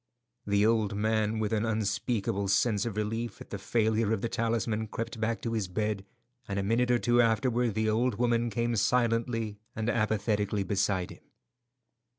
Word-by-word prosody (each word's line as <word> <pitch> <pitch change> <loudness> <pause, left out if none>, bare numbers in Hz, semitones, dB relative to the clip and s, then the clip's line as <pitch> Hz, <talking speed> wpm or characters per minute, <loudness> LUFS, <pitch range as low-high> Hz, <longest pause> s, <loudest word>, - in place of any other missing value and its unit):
The 100 0 +3
old 110 -2 +2
man, 110 +1 +1
with 110 0 -1
an 110 -1 +1
unspeakable 105 -2 -1
sense 105 +2 +2
of 105 -3 -5
relief 115 +2 -2
at - - -12
the 100 - -4
failure 110 +1 +1
of 110 - -1
the 115 - -1
talisman, 115 -1 -1
crept 115 +1 -5
back 115 +1 -1
to 115 - -2
his 110 -4 -1
bed, 105 +1 -2 0.4
and 100 - -3
a 100 - 0
minute 115 +5 +1
or 120 - +4
two 120 0 +3
afterward 115 0 +1
the 110 0 +1
old 115 +2 +1
woman 120 0 +1
came 115 +2 -1
silently 115 -1 +1 0.2
and 110 +1 0
apathetically 105 -2 0
beside 95 -1 0
him. - - -14
110 Hz, 170 wpm, -29 LUFS, 105-115 Hz, 0.4 s, or